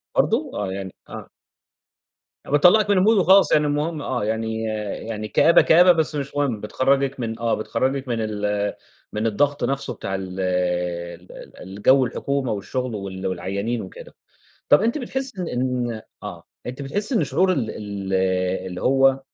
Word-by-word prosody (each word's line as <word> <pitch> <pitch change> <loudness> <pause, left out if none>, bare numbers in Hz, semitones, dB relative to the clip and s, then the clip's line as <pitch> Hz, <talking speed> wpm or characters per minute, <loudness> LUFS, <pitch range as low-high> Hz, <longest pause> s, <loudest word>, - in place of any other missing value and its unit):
برضه؟ - - +1
آه، 95 -2 -3
يعني 95 -1 -6
آه. - - -8 1.2
بتطلّعِك 180 +9 +5
من 190 -2 +4
الmood - - +5
وخلاص، 190 +2 +5
يعني 150 0 +4
المهم، 150 +1 -1
آه، 125 -5 -2
يعني 110 0 -2 0.4
يعني 110 -1 -4
كآبة، 165 +9 +5
كآبة 180 +2 +6
بس 160 -2 0
مش 140 0 -4
مهم، 135 -7 0
بتخرّجِك 135 +4 0
من 115 -1 -4
آه 115 -1 0
بتخرّجِك 130 +5 -2
من 120 -2 -1
ال 105 -1 -1 0.4
من 110 +2 0
الضغط 140 +6 0
نفْسه 135 0 -2
بتاع 95 -2 -4
ال 95 0 -6
ال 90 -1 -2
ال - - -12
الجو 105 +8 +3
الحكومة 140 0 -2
والشغل 115 +4 -3
وال 95 -1 -5
والعيّانين 100 +6 -2
وكده. - - -11 0.5
طَب - - +6
أنتِ 235 +6 +1
بتحسّي 265 -5 -4
إن 170 - -3
إن 125 -3 -2 0.2
آه، 90 -5 -8 0.2
أنت 130 +3 -6
بتحسّي 205 - -2
إن - - +3
شعور 185 0 +2
ال 125 -9 -1
ال 100 -2 -6 0.5
اللي 90 -1 -6
هو 135 0 +4
120 Hz, 160 wpm, -22 LUFS, 100-145 Hz, 1.2 s, كآبة